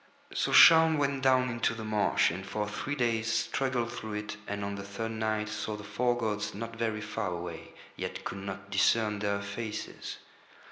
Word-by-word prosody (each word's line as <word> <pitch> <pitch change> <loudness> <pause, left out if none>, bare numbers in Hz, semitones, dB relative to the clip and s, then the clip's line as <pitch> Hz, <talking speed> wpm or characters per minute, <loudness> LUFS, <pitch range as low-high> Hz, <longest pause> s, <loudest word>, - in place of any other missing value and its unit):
So - - 0
Shaun 160 -1 +8
went 140 -2 0
down 130 -1 +4
into 120 -1 0
the 110 - -6
marsh, 105 -4 +2
and 95 +3 -5
for 105 +1 -3
three 140 +7 -3
days 115 -3 0
struggled 125 -1 0
through 110 -1 -6
it, 105 0 -4
and 100 0 -3
on 100 - -3
the 100 - -5
third 100 +3 -5
night 110 -1 -1
saw 110 0 -3
the 105 - -8
four 120 +4 0
gods 105 -4 -2
not 115 +2 -6
very 110 -2 -1
far 110 -1 -3
away, 85 -2 -6 0.2
yet - - -5
could 95 - -5
not 100 +1 -7
discern 105 +2 +3
Their 100 0 -1
faces. 105 +2 -5
110 Hz, 185 wpm, -30 LUFS, 100-115 Hz, 0.2 s, Shaun